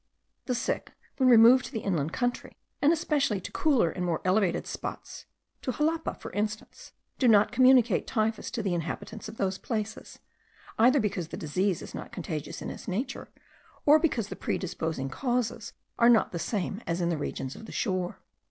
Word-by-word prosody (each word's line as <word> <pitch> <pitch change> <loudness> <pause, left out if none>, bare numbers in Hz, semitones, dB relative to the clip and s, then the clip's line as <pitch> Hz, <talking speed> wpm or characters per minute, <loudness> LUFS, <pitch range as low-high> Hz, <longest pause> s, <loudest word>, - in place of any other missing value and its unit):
The 250 - 0
sick, 240 - -2 0.2
when 260 -2 +4
removed 240 +2 +7
to - - -8
the 225 -5 -3
inland 165 -7 -1
country, 245 +4 -2 0.2
and 290 - +5
especially 290 - +1
to - - -7
cooler 260 - +2
and 180 - -4
more 170 -3 0
elevated 185 -1 +2
spots, - - -7 0.3
to 255 - -2
Xalapa, 320 +4 -1
for - - -9
instance, 210 +1 -4 0.3
do 255 - +3
not 210 -2 +5
communicate 250 -4 +4
typhus 220 -1 -1
to 235 -4 -4
the 190 -3 0
inhabitants 175 +6 -5
of 220 - -11
those 190 -1 -1
places, 220 -2 -4 0.6
either 255 +5 +6
because 200 -7 -1
the - - -7
disease 180 +4 -1
is - - -10
not - - -7
contagious 160 -5 -5
in - - -4
its - - -10
nature, 250 +8 -3 0.6
or 300 +1 +7
because 245 -10 0
the - - -5
predisposing 160 -6 -3
causes 245 - -2 0.3
are 235 0 +6
not 230 -2 +4
the 170 - -4
same 200 +2 -2
as 170 +1 -1
in 170 -1 +1
the 170 - +1
regions 135 -2 -4
of 225 - -11
the - - -9
shore. 185 -4 -2
215 Hz, 180 wpm, -28 LUFS, 180-250 Hz, 0.6 s, removed